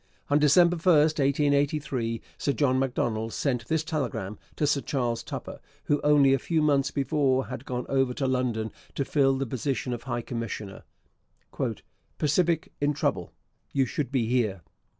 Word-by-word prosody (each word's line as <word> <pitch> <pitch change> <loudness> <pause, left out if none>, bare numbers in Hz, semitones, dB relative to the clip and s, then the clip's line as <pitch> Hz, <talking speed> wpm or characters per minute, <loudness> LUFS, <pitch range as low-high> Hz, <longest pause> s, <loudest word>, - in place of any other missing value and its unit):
On 145 - +5
December 170 +4 +5
1, 175 +2 +4
1883, 140 -4 +1 0.2
Sir 140 - 0
John 130 -3 +2
Macdonald 115 -4 -1
sent 125 -5 -1
this 160 -1 +1
telegram 125 - -3 0.2
to 150 - 0
Sir 145 -1 +2
Charles 120 -5 -1
Tupper, - - -7 0.2
who 145 - +1
only 145 -2 +5
a 135 - +2
few 160 +3 0
months 140 -2 +3
before 135 -1 +1
had 125 0 -6
gone 125 -1 -3
over 135 -2 +1
to 140 - -1
London 125 -4 0 0.2
to 140 - -1
fill 135 -1 +2
the 135 - -1
position 130 +1 -2
of 120 - -5
high 120 -2 -2
commissioner: 115 -4 -5 1.3
'Pacific 165 +2 +1
in 145 +1 +2
trouble, - - -1 0.4
you 135 -1 +3
should 130 +1 -3
be 130 -4 +1
here.' 110 -7 0
135 Hz, 155 wpm, -27 LUFS, 120-145 Hz, 1.3 s, On